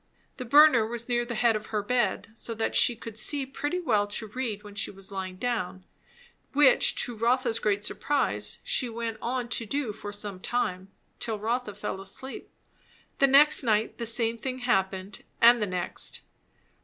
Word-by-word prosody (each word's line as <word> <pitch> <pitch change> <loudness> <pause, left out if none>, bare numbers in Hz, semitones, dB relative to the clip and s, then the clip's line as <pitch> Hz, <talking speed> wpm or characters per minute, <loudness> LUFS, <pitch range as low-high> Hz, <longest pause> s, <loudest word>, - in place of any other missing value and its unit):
The 255 - -6
burner 285 -2 +7
was 235 +1 -4
near 240 -1 0
the 235 - -3
head 230 0 +3
of 215 - -4
her 210 -2 -2
bed, 225 -3 0
so 230 0 -5
that 225 0 -1
she 240 - +4
could 225 -1 -6
see 280 +4 +1
pretty 290 +6 -3
well 210 -12 +1
to 205 +2 -1
read 220 -3 -4
when 205 -1 -11
she 205 - -2
was 195 0 -11
lying 190 -1 -5
down; 190 -4 -3 0.7
which 280 -2 +5
to 240 - -5
Rotha's 235 +1 +1
great 205 -2 0
surprise 285 +6 -1
she 250 - 0
went 230 -1 -4
on 245 0 -2
to 230 0 -2
do 275 -3 -2
for 205 -1 -8
some 205 -2 -6
time 190 -4 -2 0.3
till 225 -2 -1
Rotha 225 0 -2
fell 190 - -5
asleep. 230 +7 -7 0.7
The 275 - +6
next 285 +3 +6
night 220 -3 0
the 235 - -2
same 230 0 +1
thing 255 +1 -4
happened, 190 -3 -1 0.2
and 235 0 +7
the 210 - 0
next. 180 -2 -4
230 Hz, 180 wpm, -27 LUFS, 205-250 Hz, 0.7 s, burner